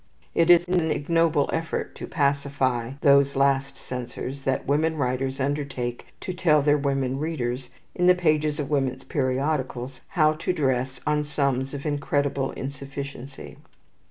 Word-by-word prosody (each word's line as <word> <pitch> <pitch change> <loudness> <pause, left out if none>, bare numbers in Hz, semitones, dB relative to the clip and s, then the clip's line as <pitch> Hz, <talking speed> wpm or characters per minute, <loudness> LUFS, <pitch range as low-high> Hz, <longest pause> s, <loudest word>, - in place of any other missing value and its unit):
It 170 0 +3
is 175 0 +7
in 180 0 +2
an 160 - -1
ignoble 160 0 +2
effort 165 0 -2
to - - -6
pacify 140 -4 0
these 140 0 +5
last 140 0 +2
censors 125 +2 -6
that 135 -1 -1
women 155 +3 +1
writers 130 0 -1
undertake 135 -3 -2
to 185 - -4
tell 155 -5 +3
their 145 0 +4
women 135 -2 0
readers, 130 -5 -3 0.2
in 180 - +2
the 180 - +7
pages 155 -4 +1
of 145 0 -3
women's 130 -2 0
periodicals, 130 -1 -2
how 155 -4 +3
to 160 +4 -2
dress 130 -4 -1
on 150 0 +1
sums 140 -2 -1
of 140 - -7
incredible 145 -2 0
insufficiency. 140 0 -7
140 Hz, 145 wpm, -25 LUFS, 130-150 Hz, 0.2 s, is